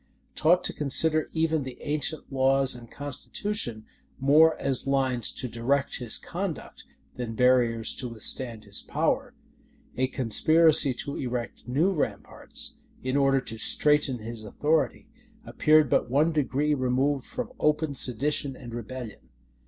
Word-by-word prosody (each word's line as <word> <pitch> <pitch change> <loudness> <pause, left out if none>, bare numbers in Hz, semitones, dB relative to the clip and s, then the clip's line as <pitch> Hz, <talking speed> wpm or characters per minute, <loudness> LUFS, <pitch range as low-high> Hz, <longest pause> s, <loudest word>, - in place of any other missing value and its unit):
Taught 175 +3 +3
to - - +1
consider 155 +2 +2
even 160 -1 0
the 130 -2 -8
ancient 150 0 -3
laws 135 0 +2
and 120 -1 -12
constitution 145 - -4 0.3
more 155 +4 +5
as 135 -1 0
lines 130 -3 +2
to 130 - -3
direct 130 +4 -1
his 120 -3 +1
conduct, 175 -3 -6 0.3
than 120 -2 -5
barriers 120 -2 +2
to 125 - -5
withstand 115 0 -3
his 100 -1 -2
power; 245 - -2 0.6
a 130 - 0
conspiracy 145 +3 +4
to 140 - -5
erect 125 -2 -5
new 150 +10 +1
ramparts, 155 - -4 0.3
in 130 +1 -2
order 135 -1 +3
to 115 -2 -7
straiten 150 0 +3
his 115 0 -6
authority, 155 - -1 0.3
appeared 155 -1 +3
but 120 - +1
one 150 +6 +2
degree 150 0 0
removed 130 +1 0
from 250 0 -6
open 150 0 +1
sedition 135 +2 +2
and 120 -3 -10
rebellion. 120 -1 -8
135 Hz, 135 wpm, -26 LUFS, 125-155 Hz, 0.6 s, more